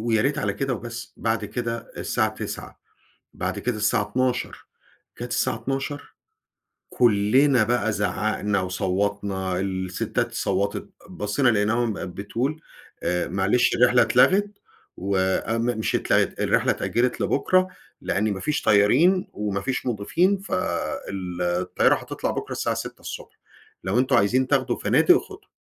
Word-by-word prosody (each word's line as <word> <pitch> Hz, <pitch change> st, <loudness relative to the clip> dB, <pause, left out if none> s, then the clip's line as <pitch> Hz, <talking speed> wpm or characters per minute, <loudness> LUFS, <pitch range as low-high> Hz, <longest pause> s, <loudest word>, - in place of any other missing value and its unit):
ويا 110 Hz, -1 st, +1 dB
ريت 140 Hz, +2 st, 0 dB
على -, -, 0 dB
كده 135 Hz, -3 st, -1 dB
وبس، 120 Hz, 0 st, -8 dB
بعد 110 Hz, -1 st, -1 dB
كده 115 Hz, +2 st, -4 dB
الساعة 110 Hz, -3 st, 0 dB
09:00، -, -, -7 dB, 0.5 s
بعد -, -, -3 dB
كده 120 Hz, 0 st, -2 dB
الساعة 105 Hz, 0 st, +2 dB
12:00، 125 Hz, +4 st, -2 dB, 0.5 s
جات 120 Hz, 0 st, -5 dB
الساعة 115 Hz, -, +1 dB
12:00 135 Hz, +4 st, -4 dB, 0.8 s
كلنا 120 Hz, +3 st, +4 dB
بقى 115 Hz, -1 st, +1 dB
زعّقنا 105 Hz, -1 st, 0 dB
وصوّتنا، 95 Hz, 0 st, -1 dB
الستات 95 Hz, -1 st, -2 dB
صوتت، 100 Hz, +2 st, -1 dB, 0.2 s
بصينا 105 Hz, +8 st, +1 dB
لقيناهم 110 Hz, +2 st, +1 dB
بتقول 115 Hz, -, -4 dB, 0.4 s
آآ، 90 Hz, 0 st, 0 dB
"معلش 100 Hz, +6 st, +2 dB
الرحلة 125 Hz, 0 st, +5 dB
اتلغت 190 Hz, -, +3 dB, 0.4 s
وام" 100 Hz, +4 st, 0 dB
مش 110 Hz, -, 0 dB
اتلغت، -, -, +1 dB
"الرحلة -, -, +2 dB
اتأجلت 120 Hz, +1 st, 0 dB
لبُكرة؛ 185 Hz, +6 st, +2 dB, 0.3 s
لأن 105 Hz, +1 st, 0 dB
ما 95 Hz, -, -5 dB
فيش 150 Hz, +8 st, -1 dB
طيارين 140 Hz, -, +4 dB
وما 105 Hz, -1 st, -2 dB
فيش 130 Hz, +5 st, -2 dB
مضيفين 160 Hz, -, +1 dB
فال 100 Hz, -, -3 dB
الطيارة 90 Hz, +1 st, +2 dB
هتطلع -, -, -4 dB
بُكرة -, -, -5 dB
الساعة -, -, -1 dB
06:00، -, -, -7 dB, 0.4 s
لو 95 Hz, +6 st, +1 dB
أنتم 130 Hz, 0 st, +2 dB
عايزين 125 Hz, +5 st, +2 dB
تاخدوا 130 Hz, -3 st, +1 dB
فنادق، 130 Hz, +10 st, +4 dB
خدوا". 410 Hz, +1 st, -13 dB
115 Hz, 125 wpm, -24 LUFS, 100-130 Hz, 0.8 s, الرحلة